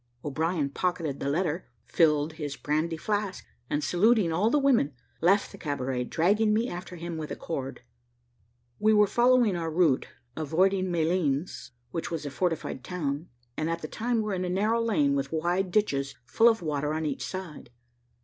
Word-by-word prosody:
O'Brien 155 +1 0
pocketed 170 -4 -2
the 140 - -2
letter 170 +2 -1 0.2
filled 150 +1 +2
his 150 -3 -5
brandy 155 +2 -1
flask, 205 +1 -2 0.2
and 145 0 -1
saluting 205 0 +3
all 195 +7 +2
the 295 - +3
women, 250 - +3 0.3
left 195 +5 +3
the 195 - -12
cabaret, 130 -4 -2
dragging 210 - +2
me 230 +3 +1
after 180 -1 -7
him 170 -1 -5
with 155 -1 -5
a - - -4
cord. 135 -5 -5 1.0
We 215 +1 +4
were 210 0 +6
following 240 -1 +3
our 165 -1 -2
route, 160 -5 +2 0.3
avoiding 185 +5 +1
Malines, 160 -4 0 0.2
which 165 - -3
was 165 -3 -4
a 145 - -4
fortified 165 -5 -2
town, 155 -2 -3 0.3
and 155 +1 -1
at 165 0 -3
the - - -3
time 230 +5 -1
were 210 -1 -2
in 185 -1 -1
a 180 - -2
narrow 215 +5 +1
lane, 165 -12 +2
with 140 0 -1
wide 175 +4 0
ditches, 140 -9 0
full 230 - +5
of 225 -5 0
water, 150 -1 -1
on 160 0 -2
each 145 -3 -2
side. 185 -9 -7
170 Hz, 175 wpm, -28 LUFS, 150-195 Hz, 1.0 s, were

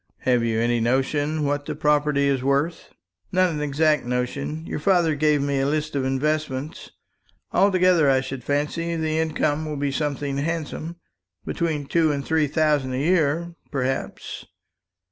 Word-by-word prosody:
"Have 125 -2 +2
you 115 -1 0
any 120 +1 +1
notion 145 +6 0
what 145 0 -1
the - - -3
property 150 -1 +2
is 135 -2 +1
worth?" 140 +5 0 0.4
"Not 185 -1 +3
an 150 -2 -3
exact 150 +1 +2
notion. 125 +6 -3
Your - - -4
father 170 -1 +3
gave 150 -1 +2
me 140 -1 0
a 135 - +1
list 150 0 -1
of 135 -2 0
investments. 145 +1 -2 0.6
Altogether, 185 -5 +4
I 130 -1 +3
should 135 -1 -6
fancy, 150 +5 -1
the 160 -1 -1
income 155 -1 0
will 150 -1 -4
be 140 0 -1
something 140 -1 -2
handsome 165 +1 -3 0.5
between 155 -4 -2
two 160 +1 +2
and 140 -2 -3
three 160 -2 +2
thousand 150 -3 +1
a - - -1
year, 165 +2 +1 0.2
perhaps. 135 -1 -3
150 Hz, 155 wpm, -23 LUFS, 140-160 Hz, 0.6 s, Altogether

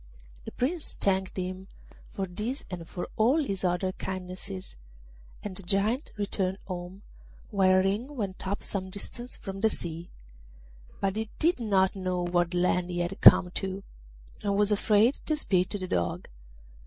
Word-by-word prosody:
The - - -6
Prince 310 +6 -1
thanked 190 -1 0
him 185 +1 -4 0.4
for 195 - -3
this 210 +9 -4
and 170 -2 -5
for 175 - -4
all 240 +7 +4
his 195 -8 -3
other 180 +1 +1
kindnesses, 180 - -6 0.7
and 205 -3 -5
the 195 - -1
Giant 205 - +1
returned 195 -2 -1
home, 180 +1 -6 0.5
while 185 -2 +5
Ring 220 +9 -1
went 195 -5 -4
up 200 +2 -2
some 190 -2 -3
distance 240 +5 -6
from 195 0 -6
the 220 - +5
sea; 170 -3 -6 0.9
but 195 +1 0
he 220 -1 -2
did 335 -2 +2
not 195 -5 +2
know 185 -2 -1
what 175 0 +1
land 180 0 +2
he 175 - -3
had 175 +3 -3
come 180 - +9
to, 195 +1 -4 0.6
and 200 -1 +1
was 210 0 +3
afraid 210 +4 +4
to 310 - +2
speak 185 -11 +2
to 205 - -1
the 185 -2 -4
Dog. 85 - -1
190 Hz, 160 wpm, -29 LUFS, 180-210 Hz, 0.9 s, come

